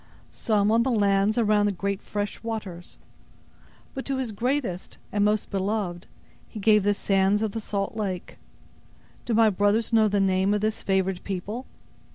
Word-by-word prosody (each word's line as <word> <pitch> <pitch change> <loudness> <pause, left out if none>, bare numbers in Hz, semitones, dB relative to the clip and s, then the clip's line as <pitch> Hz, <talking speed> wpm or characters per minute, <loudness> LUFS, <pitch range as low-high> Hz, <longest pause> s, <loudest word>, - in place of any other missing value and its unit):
Some 210 -2 +1
on 230 +1 +4
the 260 - +1
lands 205 -2 +2
around 210 -2 +3
the - - +1
great 200 +1 -3
fresh 205 -1 -4
waters; 205 -7 -6 1.0
but 265 - -5
to 275 -1 -2
His 255 -4 -2
greatest, 235 -4 -2
and 205 -1 +1
most 210 0 +1
beloved, 195 -3 -2 0.4
He 220 - -9
gave 210 +1 +4
the 205 +1 +1
sands 195 +2 +2
of 215 - -1
the 225 - -4
salt 200 0 -3
lake. 190 -5 -4 0.9
Do 235 - 0
my 225 -1 +5
brothers 205 +4 +1
know 220 -1 +5
the 205 0 +1
name 190 +1 +2
of 210 - -1
this 215 0 -1
favored 190 -1 0
people?" 205 +6 -5
205 Hz, 170 wpm, -25 LUFS, 195-220 Hz, 1.0 s, my